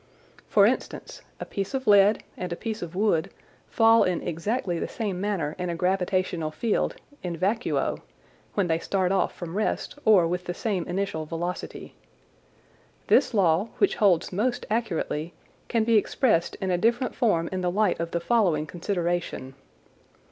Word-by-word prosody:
For - - +6
instance, - - -2 0.2
a - - -5
piece 200 +5 -4
of 265 0 -3
lead 205 0 +5
and 180 -1 -5
a - - -1
piece 220 +3 -5
of 175 0 -6
wood 190 -5 +1 0.4
fall 225 0 +5
in 180 -2 -1
exactly 175 +1 -2
the - - -2
same 200 -5 -3
manner 185 -8 -1
in 180 0 -2
a 170 - -2
gravitational 180 -2 0
field 210 +8 -1 0.3
(in 175 -2 -4
vacuo), 210 +8 0 0.6
when 200 - +2
they 165 -1 +1
start 185 0 0
off 195 - +1
from 170 -2 -7
rest 215 +6 -2
or 200 -6 +5
with 180 +1 -3
the 175 - -4
same 195 -7 -2
initial 175 -4 -2
velocity. 175 +3 -5 1.2
This - - +5
law, 185 0 +3
which 400 - +2
holds 190 -4 +3
most 240 +6 -1
accurately, 175 -7 -2 0.3
can 230 -2 +1
be 225 0 +4
expressed 210 -5 +1
in 190 -3 -2
a 175 - +1
different 235 +5 +1
form 170 -8 +1
in 185 -1 -2
the 180 - +1
light 205 0 +1
of 165 0 -2
the 170 - -1
following 170 -6 +2
consideration. 175 -5 -3
185 Hz, 160 wpm, -26 LUFS, 170-215 Hz, 1.2 s, For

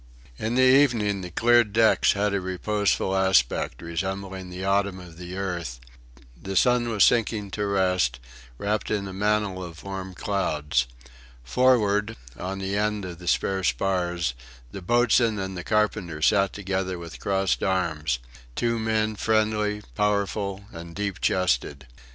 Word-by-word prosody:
In 110 +2 -1
the 130 - +4
evening 120 -7 +4
the 90 - -6
cleared 115 +3 +3
decks 110 0 +4
had 100 0 0
a 100 - 0
reposeful 95 +1 0
aspect, 90 -9 +2
resembling 95 +2 -4
the 90 +1 -6
autumn 100 -1 +1
of 85 -2 -12
the 90 +1 -7
earth. 85 -10 -4 0.6
The 95 +10 -6
sun 125 +3 +3
was 110 -3 +3
sinking 110 -4 +2
to 105 0 -2
rest, 90 -10 +1 0.4
wrapped 105 - -1
in 100 -2 -1
a 95 - -7
mantle 105 -1 0
of 85 -2 -10
warm 95 -1 -6
clouds. 75 -11 0 0.6
Forward, 105 - +2 0.2
on 95 +9 -5
the 95 +1 -3
end 105 -1 0
of 85 -2 -8
the 90 - -10
spare 95 +2 +1
spars, 85 +2 0 0.4
the 95 - -7
boatswain 120 +2 +3
and 95 -1 -4
the 90 - -5
carpenter 105 -7 0
sat 100 +4 +3
together 95 -2 -3
with 85 -1 -9
crossed 95 -1 0
arms; 80 -8 0 0.4
two 115 -1 0
men 110 -1 0
friendly, 105 -1 0
powerful, 100 -1 -1
and 85 0 -9
deep 100 -2 -3
chested. 70 -6 0
95 Hz, 145 wpm, -25 LUFS, 90-105 Hz, 0.6 s, the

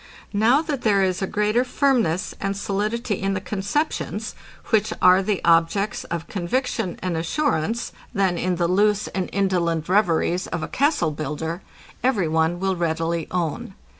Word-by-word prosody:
Now 235 +9 +4
that 295 -5 -3
there 200 -4 +3
is 185 0 0
a 190 - 0
greater 210 +5 +1
firmness 245 - +1
and 195 0 -1
solidity 210 +2 -2
in 195 0 0
the - - -1
conceptions, 205 - -2 0.4
which 215 -2 +3
are 185 +1 +6
the 195 0 -1
objects 170 +5 +2
of 170 -1 -4
conviction 205 0 -2
and 180 -2 -1
assurance, 225 - -1 0.2
than 195 -5 +1
in 180 +1 0
the 170 0 +1
loose 205 +3 +2
and 190 -2 -3
indolent 175 -5 0
reveries 180 -2 +2
of 170 -2 -3
a - - -3
castle 280 - +1
builder, 155 +4 -4 0.4
every 225 -9 +2
one 160 +2 +1
will 190 0 0
readily 165 -1 -1
own. 180 +1 -3
190 Hz, 155 wpm, -23 LUFS, 170-215 Hz, 0.4 s, are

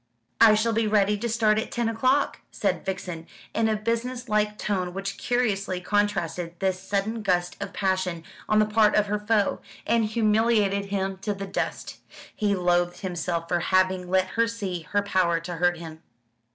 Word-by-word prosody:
"I 220 -2 +8
shall 225 +2 +1
be 225 0 +1
ready 210 -1 +3
to 235 +2 -2
start 215 -1 +3
at - - -4
ten 235 -1 -1
o'clock," 255 +5 +1
said - - -1
Vixen, 180 -3 -5 0.3
in 225 -1 +1
a 215 - +1
business 235 +3 -2
like 210 -1 +1
tone 185 -4 -2
which 195 0 -3
curiously 200 -7 0
contrasted 180 -4 -1
this 190 0 0
sudden 200 +4 -2
gust 180 -3 0
of 200 -1 -4
passion 185 -4 -1 0.3
on 215 - +3
the 215 - +5
part 215 0 +3
of 210 - +4
her 210 0 -1
foe, 210 -1 +1 0.2
and 230 -1 +2
humiliated 215 -2 +2
him 195 -1 -2
to 205 +1 -2
the 195 0 -5
dust. - - -4 0.4
He 205 -1 +1
loathed 175 -1 +1
himself 175 -3 -3
for 175 0 +1
having 185 0 +1
let 185 0 +2
her 230 +2 +1
see 190 -8 -5
her 205 0 +1
power 185 -4 +1
to 175 0 -6
hurt 175 +1 +2
him. 160 -1 -9
200 Hz, 180 wpm, -25 LUFS, 180-215 Hz, 0.4 s, I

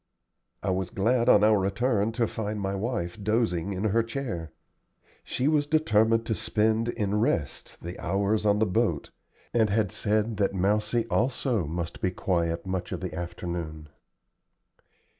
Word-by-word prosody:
I - - 0
was 95 -1 -1
glad 115 +6 +2
on 105 - +6
our 105 -1 +5
return 105 +2 +1
to 115 0 +1
find 105 -1 -4
my 95 0 -2
wife 100 -2 -3
dozing 100 -4 0
in 95 +2 -3
her 110 +2 +3
chair. 115 - -4 0.7
She 130 - -1
was 150 -1 +2
determined 115 -7 +3
to 115 - 0
spend 110 +1 +1
in 105 -3 -1
rest 80 - -1
the 85 +1 -6
hours 100 +4 0
on 105 -1 +3
the 110 - +3
boat, 110 +4 0 0.4
and 110 -3 +3
had 105 -1 +1
said 110 +1 0
that 100 -1 +1
Mousie 105 +5 +1
also 120 - +1
must 85 +1 -4
be 95 - +2
quiet 85 -2 -1
much 95 -2 -3
of - - -3
the 90 - -4
afternoon. 85 -3 -5
105 Hz, 155 wpm, -27 LUFS, 90-115 Hz, 0.7 s, on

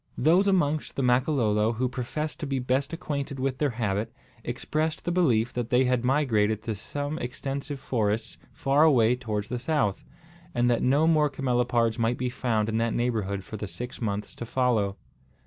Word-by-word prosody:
Those 180 +6 +4
amongst 155 -6 +1
the 135 - -1
Makololo 125 -4 +2
who 125 +3 0
professed 130 +5 -4
to 155 - -4
be 135 -1 -1
best 130 +2 0
acquainted 145 -5 -4
with 130 0 -1
their 150 - +2
habit, 110 -3 -2 0.3
expressed 155 +1 -2
the 175 - 0
belief 125 -11 +2
that 120 -1 -3
they 125 0 +4
had 125 -1 +1
migrated 110 -6 +2
to 115 - -2
same 145 +8 -4
extensive 135 +3 -4
forests 110 -4 -1
far 135 +2 +1
away 125 -7 +5
towards 105 -4 -4
the 125 - -2
south, 135 -7 0 0.5
and 120 0 +3
that 120 - +1
no 140 +5 +3
more 155 -2 +4
camelopards 120 -3 +1
might 115 +1 +1
be 125 0 -2
found 115 -4 0
in 110 0 -1
that 115 0 0
neighbourhood 105 -5 -1
for 110 - -7
the 105 - -5
six 125 +6 -7
months 105 -2 -3
to 120 - -7
follow. 115 -6 +1
125 Hz, 180 wpm, -27 LUFS, 115-140 Hz, 0.5 s, away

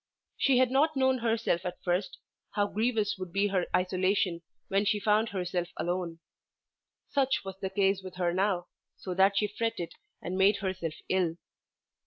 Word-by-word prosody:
She 270 -2 +3
had 255 -1 +4
not 300 +4 +3
known 260 -1 +3
herself 225 -6 0
at 180 -1 -4
first, 180 +1 -1 0.4
how 205 -1 +3
grievous 215 -2 0
would 185 -2 -6
be 200 +3 +2
her 185 -2 0
isolation 185 -1 +1 0.3
when 195 +1 +2
she 210 0 +1
found 215 +2 +2
herself 180 -2 -2
alone. 175 -1 -2 0.9
Such 270 -1 +1
was 190 0 -7
the 190 - -2
case 195 0 +2
with 185 -1 -9
her 175 -1 0
now, 185 -1 +1 0.3
so 185 - -5
that 195 +2 +4
she 210 - +3
fretted 210 -4 -3 0.3
and 185 +2 -4
made 195 +2 +5
herself 185 -5 -3
ill. 180 -3 +1
195 Hz, 165 wpm, -30 LUFS, 180-215 Hz, 0.9 s, made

